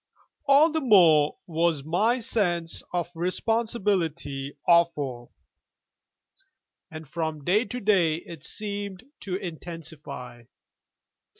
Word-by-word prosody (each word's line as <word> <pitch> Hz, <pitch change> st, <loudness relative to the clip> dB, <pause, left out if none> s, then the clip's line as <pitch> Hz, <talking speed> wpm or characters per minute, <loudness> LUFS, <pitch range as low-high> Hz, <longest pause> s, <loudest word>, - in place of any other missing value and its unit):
All 290 Hz, +4 st, +6 dB
the 315 Hz, 0 st, -1 dB
more 170 Hz, -, +5 dB
was 165 Hz, -3 st, 0 dB
my 205 Hz, -, +2 dB
sense 175 Hz, -8 st, -1 dB
of 175 Hz, -1 st, -2 dB
responsibility 175 Hz, -7 st, -1 dB
awful: 145 Hz, -8 st, +2 dB, 1.6 s
and 155 Hz, -1 st, -9 dB
from 160 Hz, -1 st, -4 dB
day 205 Hz, -, +2 dB
to 245 Hz, +4 st, -5 dB
day 190 Hz, -8 st, +3 dB
it 165 Hz, -2 st, -10 dB
seemed 200 Hz, 0 st, -5 dB, 0.2 s
to 185 Hz, -3 st, -4 dB
intensify. 160 Hz, -, -8 dB
170 Hz, 95 wpm, -26 LUFS, 155-205 Hz, 1.6 s, All